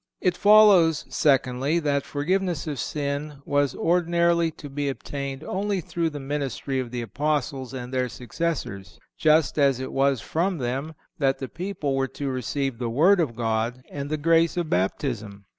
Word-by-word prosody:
It 180 -2 +1
follows, 200 -7 +6
secondly 135 +1 +2
that 145 -4 0
forgiveness 175 +3 -1
of 145 -5 -4
sin 145 +1 -3
was 145 -1 +1
ordinarily 170 -1 +2
to 145 - -10
be 140 0 -2
obtained 140 +1 -5
only 200 +3 -1
through 170 0 -2
the 150 -2 -7
ministry 135 -1 -3
of 125 -2 -3
the 120 0 -4
Apostles 140 +2 -2
and 125 -1 -7
their 130 -1 0
successors, 120 - -4 0.2
just 155 -1 +3
as 135 -3 +3
it 130 - -5
was 135 -1 +2
from 175 - -1
them 135 +4 -3 0.2
that 135 -2 +2
the 135 - -5
people 170 -6 -3
were 135 0 +1
to 140 -1 -2
receive 130 0 -2
the 120 -2 -2
word 170 +11 +4
of 140 -9 0
God 115 +2 -1
and 140 0 -5
the 155 - -1
grace 165 +2 +3
of 170 -3 -2
Baptism. 100 +1 -2
145 Hz, 165 wpm, -25 LUFS, 130-165 Hz, 0.2 s, follows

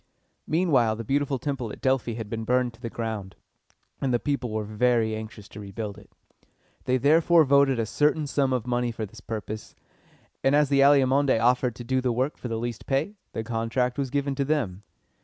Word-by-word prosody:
Meanwhile 150 -10 +2
the 115 - -6
beautiful 140 +3 0
temple 130 -5 -3
at - - -9
Delphi 130 -3 0
had 115 -2 -5
been 115 +1 -4
burned 125 +1 +1
to 115 - -20
the 115 - -4
ground, 110 -5 -5 0.7
and 135 - 0
the 120 - +3
people 140 -2 -2
were 110 0 -2
very 110 +1 +1
anxious 110 -1 -8
to 105 - -10
rebuild 105 0 -6
it. 100 - -19 0.7
They 130 - +2
therefore 160 +5 +5
voted 140 -2 +4
a 115 - 0
certain 150 +6 +1
sum 140 -1 0
of 125 -3 -1
money 120 -1 0
for 110 -1 -4
this 110 +3 -13
purpose; 110 -1 -6 0.7
and, 135 +1 +4
as 150 -1 +3
the 140 -1 +3
Alcmæonidæ 135 -2 +4
offered 125 0 +2
to 120 - -8
do 130 +2 0
the 125 -1 0
work 130 +5 -1
for - - -6
the 115 -1 -2
least 120 0 -5
pay, 145 +9 0 0.2
the 110 - -3
contract 120 +3 -1
was 135 -2 -1
given 140 +1 -1
to 140 +1 -1
them. 130 -11 -1
125 Hz, 200 wpm, -26 LUFS, 110-140 Hz, 0.7 s, therefore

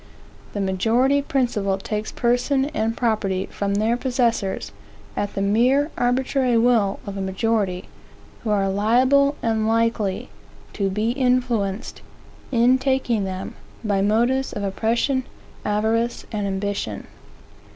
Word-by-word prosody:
The 205 - -2
majority 230 +9 +2
principle 235 -9 0
takes 210 +2 -4
person 250 +3 +1
and 225 -5 -1
property 210 -5 0
from 200 0 -1
their 220 +3 +2
possessors, 240 -6 -1 0.4
at 205 - -3
the 195 - 0
mere 255 +9 +3
arbitrary 250 0 +1
will 225 -4 +3
of 200 -1 -6
a - - -3
majority, 190 -1 -1 0.6
who 225 - -3
are 200 -2 +2
liable 255 +8 +3
and 220 -1 +1
likely 225 -3 0 0.4
to 195 -2 0
be 210 +4 0
influenced, 245 -6 0 0.5
in 250 +1 +4
taking 260 -6 0
them, 190 0 -5 0.3
by 200 -3 +1
motives 240 +6 +1
of 205 - -4
oppression, 235 +7 0 0.4
avarice, 220 +3 0
and 205 -2 -2
ambition. 195 - -3
225 Hz, 120 wpm, -22 LUFS, 200-245 Hz, 0.6 s, in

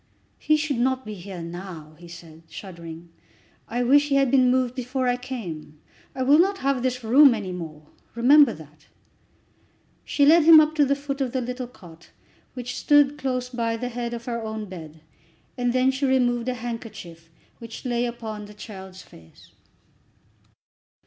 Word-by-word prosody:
"He 310 - +2
should 295 -5 -2
not 260 0 0
be 215 - -6
here 185 -2 -8
now," 170 -3 -9
he 175 - -13
said, 165 -2 -13
shuddering. 170 -3 -10 0.6
"I 245 +2 -2
wish 285 +4 +4
he 275 - +2
had 275 -2 +3
been 255 -2 +4
moved 255 -1 +1
before 255 0 -3
I 245 - +2
came. 185 - -7 0.4
I 260 - -1
will 285 +4 +5
not 390 +3 +3
have 275 -2 +1
this 250 -1 -2
room 260 +3 +6
any 200 -4 -5
more; 160 -4 -8 0.3
remember 270 +3 +6
that." 150 -3 -14 1.2
She 285 - +2
led 325 +4 +7
him 320 0 +9
up 310 0 +3
to 300 -2 +3
the 280 +1 +1
foot 280 0 -5
of 255 -3 -2
the 260 - 0
little 250 +1 -5
cot, 170 -8 -16 0.5
which 250 0 -5
stood 290 0 +3
close 255 -3 -2
by 230 -2 -2
the 245 +2 -4
head 240 0 -4
of 235 0 -9
her 235 -2 -3
own 220 -1 -5
bed, 160 -4 -11 0.5
and 245 -1 0
then 255 +1 +2
she 270 +1 -1
removed 245 -2 +1
a 250 - -2
handkerchief 215 -9 -8 0.3
which 230 +2 -10
lay 240 -1 0
upon 220 -3 -7
the 210 0 -14
child's 190 -3 -10
face. 80 -1 -19
240 Hz, 175 wpm, -24 LUFS, 190-265 Hz, 1.2 s, him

